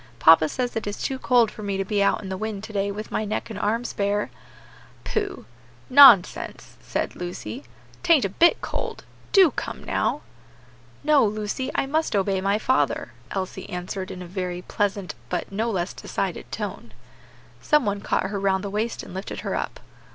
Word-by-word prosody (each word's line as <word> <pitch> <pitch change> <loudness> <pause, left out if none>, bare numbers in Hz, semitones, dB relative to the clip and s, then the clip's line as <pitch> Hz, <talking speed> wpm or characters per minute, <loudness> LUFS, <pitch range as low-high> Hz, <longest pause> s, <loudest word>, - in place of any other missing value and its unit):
Papa 160 +2 +6
says 245 - -2
it 225 - -3
is 205 - -4
too 265 -1 -2
cold 240 -4 +3
for - - -10
me 200 -2 -2
to 195 - -1
be 205 +1 0
out 200 - +2
in 190 - -6
the 190 - -2
wind 210 0 -4
to 220 - -8
day 200 0 0
with 210 +2 -7
my - - 0
neck 215 +2 -3
and 205 - -5
arms 230 +4 -1
bare." 205 +1 0 0.7
"Pooh! 410 -2 -3 0.5
nonsense!" 250 -9 +6
said - - -3
Lucy, 180 +9 -6 0.4
"'tain't 335 - +4
a - - 0
bit 335 - +4
cold; - - -4 0.3
do 380 -6 +7
come - - -5
now." - - 0 0.8
"No, 300 -1 +5
Lucy, 215 +4 -2
I - - +1
must 310 -2 0
obey 195 -1 +1
my 200 +2 +2
father," 260 +4 0 0.2
Elsie 190 -1 -4
answered 185 +1 -4
in 180 - -7
a - - -8
very 180 0 -4
pleasant 200 -2 -2 0.2
but 180 - -3
no 220 +4 -1
less 185 -4 -2
decided - - -4
tone. - - -5 0.7
Some 300 -4 +3
one 205 -1 -1
caught 190 - -1
her 200 - -2
round 195 0 +1
the 200 - -4
waist 220 +3 -2
and - - -10
lifted 190 +2 -5
her - - -3
up. - - -3
205 Hz, 185 wpm, -24 LUFS, 190-235 Hz, 0.8 s, do